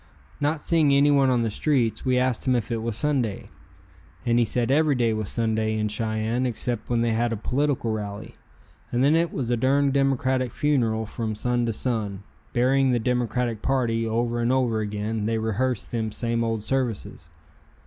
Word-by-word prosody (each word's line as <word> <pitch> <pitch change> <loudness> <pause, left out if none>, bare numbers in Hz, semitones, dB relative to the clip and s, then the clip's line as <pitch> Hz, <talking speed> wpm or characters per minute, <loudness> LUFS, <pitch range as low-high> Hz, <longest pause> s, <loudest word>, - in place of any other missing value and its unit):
Not 150 +1 0
seeing 160 -4 +3
anyone 140 -1 +4
on 125 -2 +2
the 115 - -1
streets, 125 -2 0
we 130 -1 +2
asked 125 0 0
him 130 - +3
if 120 0 -2
it 115 -1 -1
was 115 -1 -2
Sunday, 130 -8 -1 0.7
and 120 0 +3
he 120 - +3
said 120 +2 0
every 150 0 +3
day 115 -3 +1
was 110 -2 -3
Sunday 110 -1 0
in 105 0 0
Cheyenne 110 +3 -1
except 120 -1 -3
when 120 -1 +1
they 115 0 +1
had 115 +1 0
a 115 - -2
political 130 +1 -1
rally, 105 -1 -5 0.6
and 125 +1 +1
then 145 +3 +4
it 170 0 +1
was 125 -4 -3
a - - +3
durn 140 +3 +2
Democratic 130 -2 +1
funeral 115 -7 0
from 110 0 -4
sun 120 +2 0
to - - +1
sun, 105 -4 -2 0.3
burying 130 +2 +2
the 125 - +2
Democratic 120 -1 -1
party 120 -4 0
over 120 +1 -1
and 120 +1 +1
over 125 -4 +1
again, 105 +1 -3
they 115 +1 0
rehearsed 110 +1 -1
them 110 -2 -2
same 115 +1 -1
old 115 -2 -2
services. 125 -3 -3
120 Hz, 185 wpm, -25 LUFS, 110-130 Hz, 0.7 s, anyone